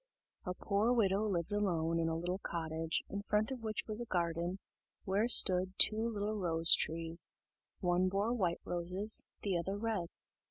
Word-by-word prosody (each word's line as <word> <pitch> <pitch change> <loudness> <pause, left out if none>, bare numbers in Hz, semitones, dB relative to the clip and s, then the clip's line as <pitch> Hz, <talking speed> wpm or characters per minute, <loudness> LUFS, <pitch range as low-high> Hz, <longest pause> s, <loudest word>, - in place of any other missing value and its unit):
A 180 - -4
poor 205 +5 0
widow 210 -3 +1
lived 175 -5 -3
alone 170 -5 -1
in 165 0 -1
a 160 - -2
little 180 +3 -4
cottage, 165 -2 -4
in 200 - -5
front 210 +3 -1
of 255 -3 -6
which 215 -2 -4
was 215 +1 -3
a - - -5
garden, 170 -1 -2 0.5
where 200 +4 0
stood 185 -5 +7
two 220 +1 +6
little 210 -1 -4
rose 165 -2 +2
trees: 165 +1 0 0.5
one 180 0 +1
bore 200 +5 -1
white 180 -8 -2
roses, 180 +5 0 0.2
the 195 -3 -1
other 195 +4 -4
red. 210 -5 -3
185 Hz, 165 wpm, -33 LUFS, 170-210 Hz, 0.5 s, stood